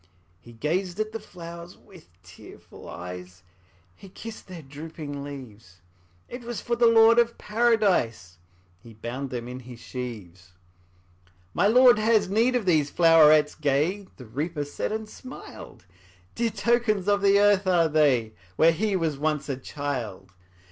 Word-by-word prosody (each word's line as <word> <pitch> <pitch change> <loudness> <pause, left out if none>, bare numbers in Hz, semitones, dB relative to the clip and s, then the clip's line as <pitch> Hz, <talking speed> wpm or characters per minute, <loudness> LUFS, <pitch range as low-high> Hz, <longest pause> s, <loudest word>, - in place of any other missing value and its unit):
'' 85 +1 -37
He 120 - -15
gazed 175 - -2
at 215 0 -2
the 225 - -5
flowers 170 -2 -11
with 185 - -18
tearful 90 - -14
eyes, 90 +1 -9 0.5
He 195 - -14
kissed 225 +4 -10
their 180 -4 -10
drooping 145 0 -8
leaves; 115 -10 -11 0.5
It 245 - -8
was 235 -3 -5
for 235 - -2
the 235 0 +4
Lord 230 +1 +6
of 235 0 +1
Paradise 200 - 0 0.4
He 115 +3 -15
bound 125 +5 -5
them 120 -2 -5
in 125 +1 -7
his 125 -1 -11
sheaves. 100 -9 -8 1.0
``My 205 - +3
Lord 245 -2 +6
has 215 -3 +2
need 235 +5 +2
of 240 -5 0
these 155 -5 +2
flowerets 155 -3 +5
gay,'' 155 +7 -1
The 125 - -11
Reaper 145 +6 -4
said, 145 - -4
and 220 0 -4
smiled; 255 - -12 0.5
``Dear 230 -2 -1
tokens 235 -5 +1
of 205 0 +2
the 200 0 +4
earth 205 -1 +3
are 175 -3 +3
they, 140 -8 +2 0.2
Where 165 - +5
he 200 +4 -1
was 160 -6 -1
once 150 -1 -1
a 135 - -1
child. 120 -9 -6
160 Hz, 155 wpm, -25 LUFS, 125-205 Hz, 1.0 s, Lord